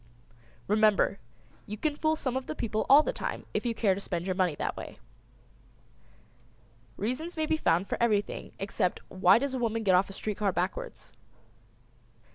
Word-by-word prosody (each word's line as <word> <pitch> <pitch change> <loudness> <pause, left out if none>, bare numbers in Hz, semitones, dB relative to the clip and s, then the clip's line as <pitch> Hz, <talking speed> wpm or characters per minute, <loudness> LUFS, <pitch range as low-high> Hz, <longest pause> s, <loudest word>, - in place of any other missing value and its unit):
"] 115 0 -29
Remember 210 -1 +3 0.5
you 210 - -5
can 300 +6 -1
fool 315 +1 +1
some 260 -5 -3
of 260 0 -3
the 310 - -4
people 220 -4 -2
all 290 +3 +8
the - - -2
time - - -4
if - - -1
you 230 - -1
care 205 -3 +2
to 195 - -5
spend 175 -3 -3
your 190 - 0
money 180 -4 +1
that - - -3
way. - - -8 2.0
Reasons 255 - -3
may 315 - +1
be 315 0 +1
found 180 - +1
for - - -3
everything 210 -3 0
except 195 -2 -1
why 185 +1 +5
does 275 +2 -2
a 260 - -2
woman 225 -1 -1
get 190 -3 +3
off 185 +2 +4
a - - -8
street 210 +1 -4
car 205 -2 +2
backwards. 180 +2 -4
210 Hz, 185 wpm, -29 LUFS, 190-260 Hz, 2.0 s, all